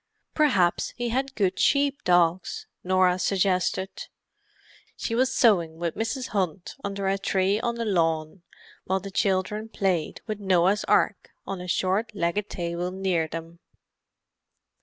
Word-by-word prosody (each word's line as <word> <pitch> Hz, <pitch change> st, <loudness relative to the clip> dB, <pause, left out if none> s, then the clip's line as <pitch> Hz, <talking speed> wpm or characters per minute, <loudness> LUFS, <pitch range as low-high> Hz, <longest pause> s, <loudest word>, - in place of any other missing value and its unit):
"Perhaps 200 Hz, -, +2 dB
he 240 Hz, -1 st, -2 dB
had 265 Hz, +3 st, -1 dB
good 195 Hz, -4 st, 0 dB
sheep 280 Hz, -1 st, +2 dB
dogs," 175 Hz, 0 st, +2 dB, 0.2 s
Norah 185 Hz, 0 st, +3 dB
suggested. 190 Hz, 0 st, 0 dB, 0.9 s
She 230 Hz, -, -3 dB
was 255 Hz, +3 st, +2 dB
sewing 175 Hz, -11 st, +3 dB
with 170 Hz, -1 st, -2 dB
Mrs. 240 Hz, +4 st, -3 dB
Hunt 185 Hz, -4 st, -2 dB
under 200 Hz, -1 st, -3 dB
a 195 Hz, +1 st, +1 dB
tree 195 Hz, +1 st, +1 dB
on 235 Hz, 0 st, -1 dB
the 230 Hz, 0 st, -3 dB
lawn, 165 Hz, -3 st, 0 dB, 0.4 s
while 190 Hz, +1 st, 0 dB
the 195 Hz, +1 st, -8 dB
children 200 Hz, +3 st, 0 dB
played 185 Hz, -8 st, -1 dB
with 215 Hz, -2 st, -4 dB
a -, -, -11 dB
Noah's 190 Hz, +2 st, +3 dB
Ark -, -, +2 dB, 0.2 s
on 195 Hz, -2 st, -5 dB
a 180 Hz, -, -7 dB
short 195 Hz, +5 st, 0 dB
legged 200 Hz, +3 st, -1 dB
table 175 Hz, 0 st, -3 dB
near 185 Hz, -3 st, 0 dB
them. 165 Hz, +1 st, -8 dB
190 Hz, 140 wpm, -26 LUFS, 175-215 Hz, 0.9 s, Norah